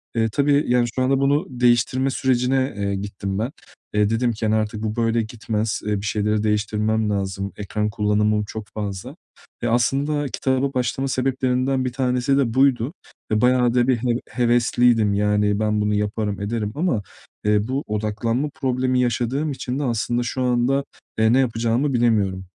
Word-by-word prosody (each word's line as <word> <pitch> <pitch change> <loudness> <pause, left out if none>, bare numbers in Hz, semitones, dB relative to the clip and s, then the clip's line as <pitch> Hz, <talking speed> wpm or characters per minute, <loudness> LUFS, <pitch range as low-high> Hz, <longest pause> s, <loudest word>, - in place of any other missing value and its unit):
Eee, 115 -1 +2
tabii 145 +2 +2
yani 125 0 +3
şu 130 - 0
anda 135 +1 +2
bunu 145 +5 +2
değiştirme 125 +1 +2
sürecine, 130 0 +1
eee, 100 -1 -1
gittim 100 0 -4
ben. 115 +5 -2 0.4
Eee, 105 -1 +2
dedim 120 +2 +1
ki: 110 0 -4
"Hani, 110 0 +2
artık 110 0 -2
bu 110 -1 -2
böyle 115 0 +1
gitmez. 110 -1 -3
Eee, 105 - +1
bir 105 - -6
şeyleri 105 +1 0
değiştirmem 105 +1 0
lazım, 100 -1 -2
ekran 105 +1 -2
kullanımım 105 0 +1
çok 105 0 -7
fazla." 100 -3 -5 0.5
E, - - +1
aslında 140 +5 +1
kitaba 130 +2 -1
başlama 130 +2 -1
sebeplerinden 130 0 0
1 125 - -2
tanesi 130 +1 +1
de 125 -5 +1
buydu. 130 +1 +2 0.4
E, 105 - +2
bayağı 125 -1 +3
da 125 0 +2
bir 130 - +3
heve 120 0 0
hevesliydim. 120 -3 +2
Yani 105 0 +1
ben 105 -1 +1
bunu 105 0 +1
yaparım, 105 0 -2
ederim 105 0 -2
ama, 150 - 0 0.4
eee, 105 0 +2
bu 135 +3 -2
odaklanma 110 +6 -1
problemi 130 -3 0
yaşadığım 125 +5 0
için 130 -1 -4
de - - -1
aslında 120 -1 0
şu 125 +2 -3
anda, 125 +2 +1 0.3
eee, 110 +1 +4
ne 130 - +4
yapacağımı 120 +2 +1
bilemiyorum. 105 -6 +1
120 Hz, 165 wpm, -22 LUFS, 105-130 Hz, 0.5 s, eee